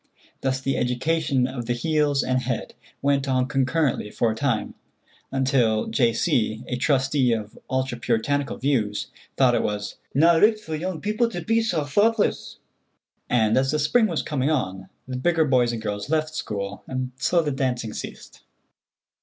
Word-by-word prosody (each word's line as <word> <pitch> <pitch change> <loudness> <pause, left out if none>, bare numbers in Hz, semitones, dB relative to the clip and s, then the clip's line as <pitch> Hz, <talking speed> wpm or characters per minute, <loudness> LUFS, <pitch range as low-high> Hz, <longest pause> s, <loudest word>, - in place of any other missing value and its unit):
Thus 130 0 0
the 135 +1 -1
education 130 +2 +1
of 125 -2 -5
the 120 - +1
heels 145 +2 +1
and 130 0 0
head 125 -2 -3 0.3
went 140 -1 +2
on 130 -1 +2
concurrently 135 -3 0
for 115 +1 0
a - - -4
time, 120 -2 -1 0.6
until 130 -5 +2
J. 120 -4 +2
C., 110 -1 0
a 125 - -3
trustee 130 -1 +2
of 105 -2 -4
ultra 130 -2 -1
Puritanical 140 +5 0
views, 115 -7 -1 0.3
thought - - +5
it - - +2
was 105 0 -3 0.2
"na 165 +4 +5
richt 215 +4 +4
for 160 -7 -5
young 170 +1 -4
people 215 +3 +1
to 175 -6 -5
be 225 +6 +2
sae 180 -8 0
thochtless," 205 - +1 0.7
and 110 -3 +3
as 135 +1 +2
the 150 - +1
spring 185 +10 +3
was 170 -6 -2
coming 140 -2 -1
on, 95 -10 -2 0.2
the 130 -1 -4
bigger 160 +4 +2
boys 125 -4 +3
and 115 -2 -5
girls 105 +4 -4
left 155 0 0
school, 100 -8 -4
and 130 -1 -3
so 170 +6 +2
the 150 - -1
dancing 125 -5 -2
ceased. - - -9
135 Hz, 170 wpm, -24 LUFS, 120-155 Hz, 0.7 s, thought